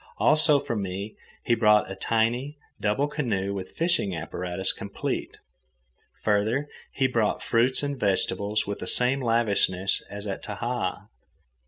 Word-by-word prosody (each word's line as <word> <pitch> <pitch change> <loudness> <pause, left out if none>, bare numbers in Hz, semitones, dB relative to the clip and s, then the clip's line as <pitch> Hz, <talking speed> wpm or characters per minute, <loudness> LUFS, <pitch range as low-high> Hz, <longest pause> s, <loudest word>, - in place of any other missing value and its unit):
Also, 155 -1 +5
for 125 -4 -3
me 100 +1 -4 0.3
he 120 - +2
brought 105 -3 +4
a - - -5
tiny, 115 +8 0 0.2
double 110 +8 +1
canoe 105 -10 -2
with 95 -2 -5
fishing 165 - +1
apparatus 90 +3 -2
complete. - - -4 0.9
Further, 110 +7 +1 0.2
he 135 - 0
brought 115 -5 +1
fruits 125 +4 +2
and 140 -2 -3
vegetables 105 0 0
with 100 0 -4
the - - -5
same 125 +2 +3
lavishness 100 -5 +1
as 100 +1 -6
at 100 -2 -4
Tahaa. 105 -2 -3
110 Hz, 135 wpm, -26 LUFS, 100-130 Hz, 0.9 s, Also